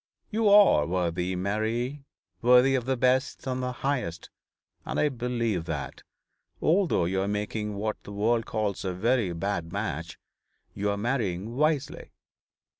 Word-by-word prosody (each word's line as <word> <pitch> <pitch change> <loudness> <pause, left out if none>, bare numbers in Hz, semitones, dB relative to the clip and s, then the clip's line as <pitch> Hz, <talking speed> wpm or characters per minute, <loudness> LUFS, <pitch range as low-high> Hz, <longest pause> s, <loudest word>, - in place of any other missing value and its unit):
'You 220 -1 +2
are 200 - +6
worthy, 90 +1 -1
Mary, 110 +8 -2 0.4
worthy 125 +2 +6
of 130 -3 0
the 130 0 0
best 130 +2 +1
and 130 -1 -2
the 125 0 -2
highest: 125 -12 -2 0.5
and - - -3
I 150 - +3
believe 120 - -2
that, - - -5 0.6
although 170 - +2
you 95 +2 0
are 95 - -1
making 105 +1 -2
what 105 +1 -3
the - - -10
world 110 +3 +1
calls 105 -3 -2
a 95 -2 -2
very 115 0 +1
bad 85 -1 -3
match, 85 -5 -4 0.6
you 100 +1 -1
are 100 - -1
marrying 110 -2 -2
wisely. 150 0 0
110 Hz, 145 wpm, -27 LUFS, 95-130 Hz, 0.6 s, are